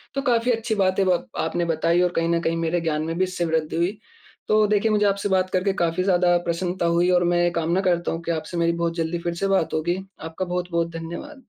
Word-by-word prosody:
तो 275 - 0
काफ़ी 235 +1 +2
अच्छी 225 -1 -1
बातें 190 -1 +2
ब 180 -7 +1
आपने 160 +2 -1
बताईं, 165 +2 +1
और 180 - +1
कहीं 165 0 +1
न 170 0 +2
कहीं 165 0 -1
मेरे 165 +1 0
ज्ञान 155 -2 -1
में 165 +1 -3
भी 185 - +2
इससे 180 -2 -2
वृद्धि 160 -1 -1
हुई। 175 +5 0 0.5
तो 215 0 +4
देखिए, 210 +1 +2
मुझे 210 -1 +2
आपसे 200 0 0
बात 185 -1 +2
करके 190 +1 0
काफ़ी 170 +2 0
ज़्यादा 180 -2 +3
प्रसन्नता 175 +1 -1
हुई, 170 +1 +2
और 180 -1 +3
मैं 175 0 +2
ये 175 - +3
कामना 170 +4 +1
करता 175 -2 0
हूँ 165 - -4
की 170 - -2
आपसे 165 +2 -4
मेरी 170 0 +2
बहुत 170 0 -1
जल्दी 165 0 -2
फिर 170 - 0
से - - +3
बात 190 -5 +1
होगी। 175 +3 0 0.2
आपका 160 +4 -5
बहुत-बहुत 175 -1 -2
धन्यवाद। 175 - -8
175 Hz, 240 wpm, -23 LUFS, 165-190 Hz, 0.5 s, तो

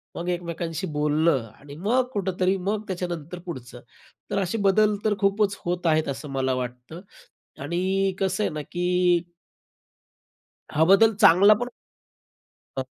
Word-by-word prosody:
मग 170 +1 -5
एकमेकांशी 170 0 -3
बोलणं 150 -3 +1
आणि 140 0 -12
मग 225 +10 +1
कुठेतरी, 190 -1 0
मग 205 +3 -2
त्याच्यानंतर 175 -2 -5
पुढचं. 125 -7 -8 0.5
तर 200 - +1
असे 190 +4 -1
बदल 205 +2 +3
तर 215 - +3
खूपच 200 0 +1
होत 175 0 -1
आहेत 155 -1 +2
असं 140 +2 -5
मला 130 -1 0
वाटतं 125 +6 -6 0.6
आणि 190 +4 0
कसं 190 +2 0
आहे - - 0
ना, 150 - -4
की 175 +2 +1 1.5
हा, 155 +2 +3
बदल 215 +5 +5
चांगला. 200 0 +6
पण 245 - -2 1.1
अ. - - 0
180 Hz, 135 wpm, -25 LUFS, 155-195 Hz, 1.5 s, चांगला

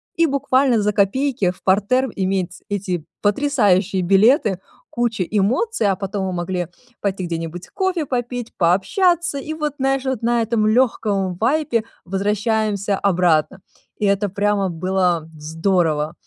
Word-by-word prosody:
и 335 - +3
буквально 265 -4 +2
за 210 - +1
копейки 210 0 +1
в 180 - -18
партер 210 +7 +2
иметь 185 -2 -2
эти 185 -5 -3 0.2
потрясающие 205 -5 +2
билеты, 195 - +3 0.3
кучу 235 -5 -1
эмоций. 215 - 0
А 195 - +2
потом 195 +1 -3
мы 185 - -3
могли 175 0 -2 0.3
пойти 195 -2 -2
где-нибудь 165 +1 -5
кофе 375 -5 -1
попить, 245 -2 -4
пообщаться. 310 - +2
И 310 +3 -5
вот, 300 -2 -3
знаешь, 270 0 0
вот 260 -4 -2
на 235 0 +1
этом 225 -1 +1
лёгком 215 -5 +1
вайбе 240 -1 +1 0.2
возвращаемся 205 +1 0
обратно. 180 -1 +1 0.4
И 210 - -1
это 200 +1 +2
прямо 200 0 0
было 175 -1 0
здорово. 160 -1 0
205 Hz, 135 wpm, -20 LUFS, 185-245 Hz, 0.4 s, и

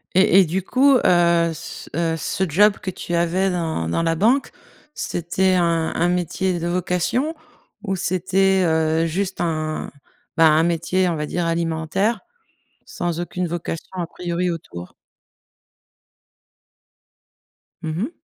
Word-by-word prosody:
Et 190 0 +6
et - - +3
du 180 +3 -2
coup, 265 +6 +4
heu, 170 -1 +3
c 165 +2 -9
heu, 165 -1 0
ce 190 - -2
job 205 +5 +4
que 185 - -4
tu 175 - -6
avais 175 +3 +1
dans 160 - -2
dans 165 - 0
la 165 0 +1
banque, 235 - +2 0.4
c'était 185 +2 0
un 170 -2 +1
un 175 - +2
métier 180 0 -1
de 170 - -3
vocation 180 - -1 0.5
ou 195 -2 -1
c'était, 190 +1 +1
heu, 160 0 +2
juste 190 +4 -2
un, 155 -2 -2 0.4
bah, 165 -1 +6
un 155 +1 +4
métier, 175 +2 +1
on 165 - -1
va 150 - -3
dire, 175 -1 -2
alimentaire 165 +6 -1 0.6
sans 175 -1 -3
aucune 180 +1 -3
vocation 165 -1 -5
à 170 - -1
priori 175 +1 -3
autour? 90 - -8 2.9
Mmh 155 -1 -3
mh. 225 - -1
175 Hz, 140 wpm, -21 LUFS, 165-190 Hz, 2.9 s, Et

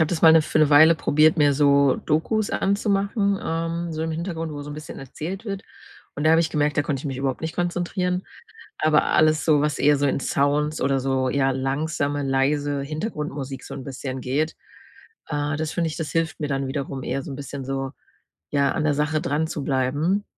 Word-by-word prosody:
habe 160 - +3
das 175 -2 -2
mal 160 - +9
'ne 160 -1 +6
für 155 - -1
'ne 155 - +4
Weile 155 +3 +8
probiert, 155 +1 +3
mir 145 -2 +4
so 140 -1 +4
Dokus 200 +8 0
anzumachen, 200 0 +1
ähm, 165 +1 -2
so 155 0 -3
im 160 0 -2
Hintergrund, 165 -1 -4
wo 145 -1 -6
so 145 - -8
'n 145 - -6
bisschen 155 0 -8
erzählt 165 - -6
wird. 195 -3 -4 0.5
Und 145 - -4
da 155 - +5
habe 165 +1 +5
ich 165 -1 0
gemerkt: 150 0 0
Da 145 - +3
konnte 145 -2 -2
ich - - -12
mich 135 -2 -3
überhaupt 135 -1 -2
nicht 160 0 -5
konzentrieren. 180 +1 -1 0.6
Aber 155 -1 +3
alles 155 0 +3
so, 150 -3 +4
was 150 -2 -1
eher 145 0 +4
so 145 - +1
in 140 - +1
Sounds 145 +3 0
oder 135 0 +2
so 130 0 0
ja, 135 0 +2
langsame, 140 +2 -1
leise 140 +1 0
Hintergrundmusik 150 - -5
so - - -8
'n 135 0 -7
bisschen 130 -1 -5
geht, 140 +6 -1 0.7
äh, 145 0 -1
das 155 0 -2
finde 170 -1 0
ich, 155 - -6
das 155 -3 -4
hilft 165 -1 -1
mir 150 - -1
dann 135 -1 -1
wiederum 135 -1 -4
eher 135 - -2
so - - -7
'n 135 - -5
bisschen 140 -1 -6
so, 135 0 -3 0.6
ja, 140 -1 +2
an - - -2
der 150 - +2
Sache 150 +1 0
dran 150 +3 0
zu 150 -2 -5
bleiben. 145 +9 0
150 Hz, 215 wpm, -23 LUFS, 140-160 Hz, 0.7 s, mal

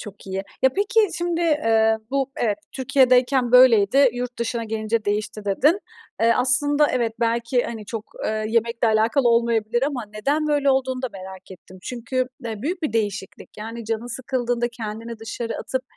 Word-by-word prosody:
Çok 205 -1 -11
iyi. 190 - -4 0.3
Ya, 265 - +5
peki, 415 - +2 0.2
şimdi, 345 -1 -1
eee, 225 -9 +3
bu, 275 -1 0
evet, 210 -3 0
"Türkiye'deyken 255 -2 +3
böyleydi, 250 +1 +6
yurt 245 0 -5
dışına 235 0 -2
gelince 220 0 -2
değişti." 210 0 -2
dedin. 295 - +2 0.4
Eee, 230 0 +5
aslında, 290 +4 +3
evet, 235 -3 0
belki, 235 +2 +1
hani, 220 -3 -6
çok, 220 -1 -5 0.2
eee, 215 0 -1
yemekle 230 0 +1
alakalı 230 +4 +2
olmayabilir 235 0 +1
ama 270 -5 -1
neden 285 +8 0
böyle 285 -2 +2
olduğunu 260 -1 0
da - - 0
merak 190 0 -10
ettim. 185 0 -13
Çünkü, 255 +1 -2 0.2
eee, 220 -1 -5
büyük 345 +4 -3
bir 305 - -1
değişiklik. 205 -3 -3
Yani, 225 +1 -7
canın 225 +1 -3
sıkıldığında 245 -1 -2
kendini 230 0 -7
dışarı 230 +1 -5
atıp 260 0 -3
235 Hz, 160 wpm, -22 LUFS, 220-260 Hz, 0.4 s, böyleydi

